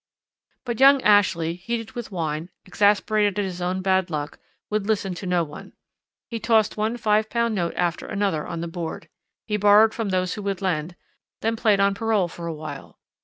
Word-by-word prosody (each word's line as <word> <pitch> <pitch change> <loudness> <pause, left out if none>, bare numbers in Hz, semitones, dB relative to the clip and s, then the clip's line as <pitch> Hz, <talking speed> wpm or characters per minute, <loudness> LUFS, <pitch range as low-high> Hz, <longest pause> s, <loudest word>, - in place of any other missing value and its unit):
But 240 -2 -3
young 275 +1 +7
Ashley, 190 -6 +3
heated 225 +5 -5
with 240 -4 -7
wine, 160 -2 -3 0.2
exasperated 205 +1 +2
at 205 - 0
his 180 -1 -6
own 185 +1 -2
bad 190 -1 +2
luck, 150 -2 -4 0.3
would 210 -1 -1
listen 205 -4 0
to 185 +2 -7
no 180 -1 +2
one; 150 -2 -10 0.5
he 230 - -5
tossed 220 -1 +2
one 220 +3 -1
£5 220 +1 +1
note 175 -4 -1
after 175 -1 -1
another 200 -7 -1
on 170 -1 -5
the 170 - -3
board, 165 -1 -6 0.4
he 210 -2 -1
borrowed 210 +2 +6
from 225 -3 -3
those 185 -1 0
who 210 - -6
would 195 -2 -2
lend, 175 -3 -2 0.5
then 225 +1 0
played 215 -3 +2
on 200 0 +3
parole 210 -3 +1
for 170 0 -8
a 165 - -3
while. 155 +1 -9
200 Hz, 185 wpm, -24 LUFS, 175-215 Hz, 0.5 s, young